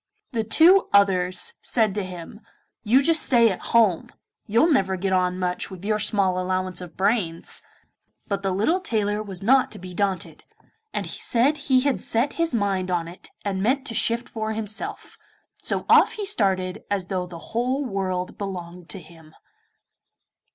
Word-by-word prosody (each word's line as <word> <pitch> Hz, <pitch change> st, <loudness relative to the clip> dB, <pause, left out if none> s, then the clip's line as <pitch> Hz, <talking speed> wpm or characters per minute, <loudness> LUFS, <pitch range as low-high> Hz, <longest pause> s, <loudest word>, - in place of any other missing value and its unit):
The 230 Hz, -4 st, -1 dB
two 335 Hz, -, +5 dB
others 185 Hz, -3 st, +3 dB
said 220 Hz, -5 st, +1 dB
to 205 Hz, 0 st, -2 dB
him, 180 Hz, +1 st, -9 dB, 0.4 s
'You 250 Hz, +6 st, +3 dB
just 325 Hz, +2 st, +4 dB
stay 235 Hz, -3 st, +4 dB
at 185 Hz, -, -6 dB
home, 215 Hz, -8 st, +3 dB, 0.4 s
you'll 235 Hz, +11 st, +3 dB
never 190 Hz, -9 st, +2 dB
get 190 Hz, +1 st, -1 dB
on 180 Hz, 0 st, +1 dB
much 180 Hz, -1 st, -2 dB
with 190 Hz, 0 st, -10 dB
your 215 Hz, 0 st, +1 dB
small 195 Hz, -3 st, +1 dB
allowance 185 Hz, 0 st, -1 dB
of 175 Hz, -3 st, -10 dB
brains.' 190 Hz, -5 st, 0 dB, 0.6 s
But 200 Hz, -1 st, -2 dB
the 195 Hz, -, -1 dB
little 215 Hz, -, +1 dB
tailor 210 Hz, -, -1 dB
was 195 Hz, -3 st, -7 dB
not 260 Hz, +4 st, +4 dB
to -, -, -6 dB
be 180 Hz, 0 st, -9 dB
daunted, 190 Hz, -2 st, -2 dB, 0.5 s
and -, -, -3 dB
said 265 Hz, +6 st, +1 dB
he 260 Hz, -1 st, +5 dB
had 280 Hz, 0 st, 0 dB
set 240 Hz, +5 st, +1 dB
his 335 Hz, -1 st, 0 dB
mind 200 Hz, -5 st, 0 dB
on 175 Hz, -2 st, -1 dB
it 175 Hz, +2 st, -11 dB, 0.2 s
and 190 Hz, -2 st, -1 dB
meant 260 Hz, +6 st, +1 dB
to 235 Hz, -, -6 dB
shift 235 Hz, +2 st, 0 dB
for 220 Hz, -1 st, -3 dB
himself, 215 Hz, -1 st, -5 dB, 0.4 s
so -, -, -2 dB
off -, -, +6 dB
he 420 Hz, -, -4 dB
started 195 Hz, -, 0 dB
as 200 Hz, -3 st, -1 dB
though 185 Hz, -1 st, -3 dB
the 170 Hz, +2 st, -11 dB
whole 255 Hz, +4 st, 0 dB
world 185 Hz, -4 st, -3 dB
belonged 180 Hz, -3 st, -6 dB
to 195 Hz, -, -5 dB
him. 160 Hz, -2 st, -17 dB
200 Hz, 170 wpm, -24 LUFS, 185-230 Hz, 0.6 s, off